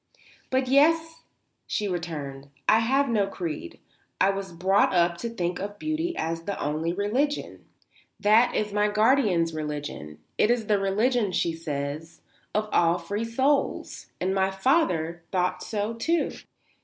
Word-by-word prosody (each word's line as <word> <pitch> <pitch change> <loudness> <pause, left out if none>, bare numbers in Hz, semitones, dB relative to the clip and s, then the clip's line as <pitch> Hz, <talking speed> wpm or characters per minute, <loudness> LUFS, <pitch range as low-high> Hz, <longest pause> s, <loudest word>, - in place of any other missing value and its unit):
"But, 260 0 +1
yes," 325 +4 +3 0.5
she 210 - -1
returned. 150 -6 -5 0.2
"I 220 - +6
have 270 +5 +2
no 210 -5 +1
creed. 165 - -5 0.4
I 195 - +4
was 195 -1 -5
brought 185 +3 +2
up 170 0 +3
to 235 - -3
think 180 -6 -2
of 205 +1 -5
beauty 315 +6 -2
as 165 +1 -2
the 200 - -3
only 155 +3 -1
religion. 230 +11 -1 0.5
That 220 +4 +4
is 210 -1 -1
my 210 0 +3
guardian's 210 -6 +3
religion. 145 - -5 0.2
It 210 - +4
is 240 -2 +1
the 210 -1 +2
religion, 210 +2 +1
she 170 - +1
says, 155 0 -5 0.3
of 215 0 +1
all 170 0 +4
free 205 +6 -3
souls. 265 +5 0
And 185 +1 0
my 190 0 +2
father 190 - +1
thought 180 -1 0
so, 210 +1 -2
too." 325 +9 0
200 Hz, 145 wpm, -26 LUFS, 170-230 Hz, 0.5 s, I